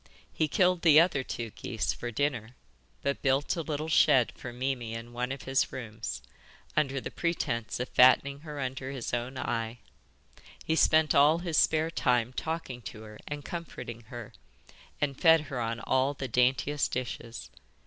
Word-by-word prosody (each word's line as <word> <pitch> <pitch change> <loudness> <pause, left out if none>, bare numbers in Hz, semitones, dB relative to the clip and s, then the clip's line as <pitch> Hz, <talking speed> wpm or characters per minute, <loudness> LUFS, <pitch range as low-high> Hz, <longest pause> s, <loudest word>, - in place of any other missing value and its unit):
He 155 - +1
killed 180 +3 +2
the 155 -3 +7
other 165 -5 +3
two 115 -3 -5
geese 115 +1 -2
for 120 - -5
dinner, 125 -2 -2 0.5
but 140 0 -1
built 135 +3 +1
a 170 - -2
little 155 0 -3
shed 130 -6 +4
for 120 - -8
Mimi 125 -2 -3
in 115 +1 -8
one 125 +1 -2
of 135 -1 -6
his 135 0 +1
rooms, 110 -3 -6 0.5
under 140 -3 +1
the - - -6
pretence 125 -11 -2
of 125 - -2
fattening 135 +2 +5
her 150 -1 -8
under 130 0 -4
his 135 -4 -5
own 120 +2 -2
eye. 115 -2 -2 0.9
He 160 - +1
spent 155 -2 +4
all 145 +3 +6
his 170 -3 0
spare 160 +1 +2
time 125 -5 +1
talking 160 -5 -4
to 110 -1 -9
her 105 -1 -12
and 145 -1 -6
comforting 125 -9 -7
her, 120 -3 -8 0.7
and 140 -2 -2
fed 165 -2 +7
her 135 -4 -5
on 115 0 -2
all 130 +4 +1
the 135 - -4
daintiest 130 +4 +1
dishes. 120 -1 -5
130 Hz, 170 wpm, -29 LUFS, 120-150 Hz, 0.9 s, the